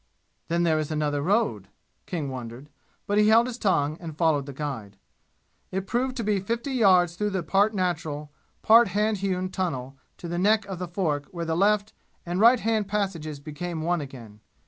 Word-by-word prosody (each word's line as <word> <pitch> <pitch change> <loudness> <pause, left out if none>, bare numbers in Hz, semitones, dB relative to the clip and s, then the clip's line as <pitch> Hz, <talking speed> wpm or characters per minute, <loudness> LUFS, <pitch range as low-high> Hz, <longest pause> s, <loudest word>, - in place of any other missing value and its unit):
"Then 170 +1 +1
there 160 -2 +2
is 155 - -3
another 150 -2 -1
road?" 175 - 0 0.4
King 160 -6 -3
wondered, 125 +2 -8 0.4
but 205 +1 +1
he 210 - +5
held 225 +2 +6
his 250 -1 -6
tongue 155 -6 +1
and 160 -3 -8
followed 155 -4 +2
the - - -5
guide. 130 -9 -6 0.7
It 190 +1 -3
proved 255 +5 -1
to 235 - -2
be 205 -1 +1
fifty 235 +7 -3
yards 185 -8 +4
through 205 0 -1
part 200 +6 +2
natural, 160 -5 -2 0.3
part 230 +1 +7
hand 210 +3 0
hewn, 185 -1 -2
tunnel 135 -8 -3 0.2
to 175 - -8
the 175 +1 -2
neck 210 +3 +3
of 190 -3 -6
the 180 - -4
fork 160 -5 -2
where 170 -3 -5
the 160 0 -1
left 205 +3 +2 0.3
and 175 +1 -2
right 235 +3 +6
hand 220 -2 0
passages 185 -8 -2
became 155 +3 -5
one 175 0 0
again. 120 -7 -10
175 Hz, 185 wpm, -26 LUFS, 150-205 Hz, 0.7 s, part